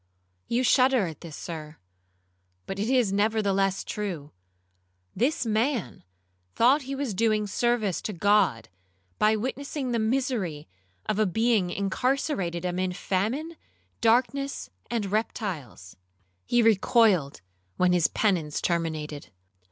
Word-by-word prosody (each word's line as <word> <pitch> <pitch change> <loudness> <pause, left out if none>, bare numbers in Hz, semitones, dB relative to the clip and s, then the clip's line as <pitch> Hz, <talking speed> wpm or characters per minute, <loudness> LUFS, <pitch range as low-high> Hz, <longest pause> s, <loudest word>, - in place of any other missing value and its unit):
You 240 +2 +1
shudder 255 -3 +4
at 160 -3 -7
this, 165 -3 -8
Sir, 155 -2 -7 0.9
but 195 - -5
it 210 +3 -1
is 245 -7 +2
nevertheless 200 -2 +1
true; 175 -9 -5 0.8
this 250 +5 +1
man 220 - -1 0.5
thought 265 +6 +4
he 275 +1 -5
was 270 -5 -2
doing 215 +1 +1
service 215 -2 0
to - - -4
God, 190 - +2 0.5
by 215 +1 +4
witnessing 265 +3 -3
the 235 - +1
misery 220 - -1 0.4
of 215 - -1
a 215 - +3
being 220 -1 +2
incarcerated 195 - -1
amid 180 0 -1
famine, 240 - -2 0.5
darkness, 255 +4 +1 0.2
and 230 -3 -1
reptiles. 185 - -3 0.5
He 240 -1 +3
recoiled 205 - +3 0.4
when 180 -1 +3
his 175 -3 +4
penance 170 -8 0
terminated. 155 -4 -2
210 Hz, 115 wpm, -26 LUFS, 180-240 Hz, 0.9 s, shudder